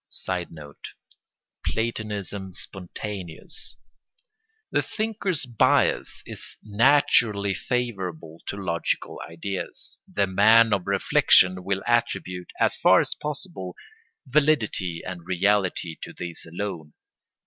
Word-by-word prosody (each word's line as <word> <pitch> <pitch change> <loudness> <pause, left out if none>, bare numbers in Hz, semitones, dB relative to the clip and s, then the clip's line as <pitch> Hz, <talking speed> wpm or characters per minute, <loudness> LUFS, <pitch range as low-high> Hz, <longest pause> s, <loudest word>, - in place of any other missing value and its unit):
[Sidenote: 80 -5 -5 0.7
Platonism 105 -4 -3
spontaneous.] 95 -1 -6 0.9
The - - +3
thinker's 205 -9 -1
bias 120 -3 +2
is - - -7
naturally 110 -3 +3
favourable 90 -8 -3
to 100 - -4
logical 85 -4 -2
ideas. 90 +3 -6
The 100 - +2
man 110 +4 +6
of 100 -2 -1
reflection 95 -1 +4
will 95 +1 -1
attribute, 115 -6 0
as - - +3
far - - +6
as - - 0
possible, 150 - -5 0.5
validity 125 - +1
and 90 -2 -6
reality 95 -3 +1
to - - -7
these 85 -1 -7
alone. 85 -5 -5
100 Hz, 95 wpm, -25 LUFS, 90-115 Hz, 0.9 s, man